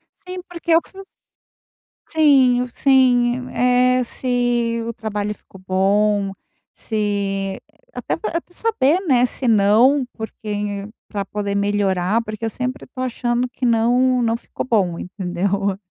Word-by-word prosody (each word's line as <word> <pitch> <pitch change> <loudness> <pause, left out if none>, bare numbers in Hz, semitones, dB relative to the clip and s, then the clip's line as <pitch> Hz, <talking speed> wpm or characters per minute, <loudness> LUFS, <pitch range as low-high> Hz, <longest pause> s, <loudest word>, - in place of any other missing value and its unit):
Sim, 365 -2 -8
porque 335 -1 0
o 330 - +5
que 390 +2 -13 1.0
Sim, 265 -6 +4
sim. 250 -1 +2
É 250 0 +3
se 240 -2 0
o 235 - -3
trabalho 210 -1 -3
ficou 195 - -17
bom, 200 +1 +2 0.4
se 200 -3 -2 0.3
até - - -3
até 350 -4 -4
saber, 355 -7 +1
né? 250 -4 +4
Se 250 +1 -3
não, 230 +6 +4
porque 205 -2 -5 0.2
pra 200 -2 -4
poder 200 0 -3
melhorar, 200 0 +1
porque 215 0 -5
eu 225 - 0
sempre 255 +4 -4
tô 255 - -8
achando 245 -1 -1
que 255 - -4
não 245 +2 +3
não 230 -1 +1
ficou - - -6
bom, 195 -9 +1
entendeu. 190 +1 -2
230 Hz, 130 wpm, -20 LUFS, 205-255 Hz, 1.0 s, o